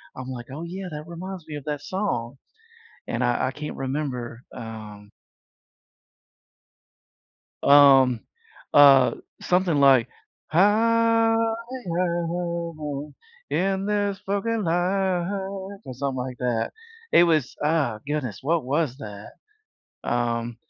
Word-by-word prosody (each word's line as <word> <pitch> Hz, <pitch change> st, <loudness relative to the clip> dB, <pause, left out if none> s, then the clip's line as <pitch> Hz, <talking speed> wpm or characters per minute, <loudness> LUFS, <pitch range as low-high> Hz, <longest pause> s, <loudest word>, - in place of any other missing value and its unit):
I'm 130 Hz, 0 st, -7 dB
like, 120 Hz, -2 st, -7 dB
"Oh, 150 Hz, +5 st, -6 dB
yeah. 185 Hz, +2 st, -6 dB
That 150 Hz, -1 st, -7 dB
reminds 180 Hz, 0 st, -7 dB
me 155 Hz, -, -8 dB
of 145 Hz, -, -8 dB
that 150 Hz, -1 st, -3 dB
song." 140 Hz, -, -3 dB, 0.7 s
And 120 Hz, +2 st, -1 dB
I 120 Hz, +1 st, +1 dB
I -, -, -2 dB
can't 150 Hz, +2 st, -6 dB
remember, 130 Hz, -3 st, -4 dB
um 110 Hz, -3 st, -9 dB, 2.5 s
Um, 135 Hz, -4 st, +7 dB, 0.5 s
uh, 140 Hz, -3 st, +7 dB, 0.3 s
something 180 Hz, -4 st, +2 dB
like, 135 Hz, -4 st, +6 dB, 0.4 s
Higher 225 Hz, +5 st, +4 dB, 2.1 s
in 190 Hz, +1 st, 0 dB
this 205 Hz, -1 st, 0 dB
fucking 205 Hz, +2 st, -1 dB
life, 180 Hz, +1 st, +1 dB, 0.6 s
or 130 Hz, -, -6 dB
something 135 Hz, +1 st, -3 dB
like 125 Hz, 0 st, -4 dB
that. 120 Hz, -3 st, -1 dB, 0.4 s
It -, -, +7 dB
was 155 Hz, -6 st, +2 dB
uh, 150 Hz, -8 st, +1 dB
goodness. 140 Hz, -9 st, -3 dB
What 160 Hz, +2 st, +1 dB
was 140 Hz, 0 st, 0 dB
that? 105 Hz, -6 st, -9 dB, 0.7 s
Um, 120 Hz, -1 st, -1 dB
145 Hz, 105 wpm, -24 LUFS, 125-180 Hz, 2.5 s, Um